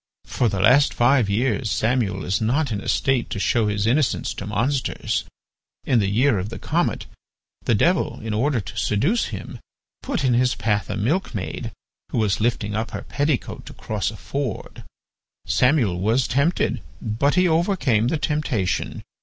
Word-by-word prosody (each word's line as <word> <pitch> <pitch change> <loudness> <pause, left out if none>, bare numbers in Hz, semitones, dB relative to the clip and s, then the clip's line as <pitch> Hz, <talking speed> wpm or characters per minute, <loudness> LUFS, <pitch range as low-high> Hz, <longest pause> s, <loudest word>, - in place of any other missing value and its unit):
For 120 - 0
the 100 -2 -2
last 125 +8 +5
five 120 -3 +3
years 110 +2 0
Samuel 110 -3 0
is 95 +4 0
not 130 +5 +1
in 100 -2 -2
a - - -8
state 135 -3 +1
to - - -4
show 110 +2 +2
his 105 0 0
innocence 130 +4 +1
to 100 - -7
monsters. 125 +6 -1 0.6
In 125 - +2
the 100 -2 +1
year 115 +1 +3
of 95 +3 -4
the 115 - -7
comet, - - -1 0.6
the 120 - +3
Devil 175 - +1
in 110 -1 -4
order 125 +4 +1
to 100 - -8
seduce 150 - +1
him, - - -7 0.4
put 260 - -2
in 130 -2 +3
his 125 +1 +2
path 105 -5 -1
a - - -2
milkmaid, 110 - -2 0.4
who - - -3
was 110 -2 +1
lifting 110 -2 0
up 110 +1 -2
her - - -6
petticoat 145 -2 -2
to - - -9
cross 105 -3 -3
a 110 - -9
ford. 135 0 -5 0.6
Samuel 125 - +2
was 115 +7 +2
tempted, 140 +8 +1 0.2
but 115 +7 0
he 185 0 +4
overcame 160 - +2
the 160 - 0
temptation. 140 - -1
120 Hz, 170 wpm, -23 LUFS, 105-140 Hz, 0.6 s, last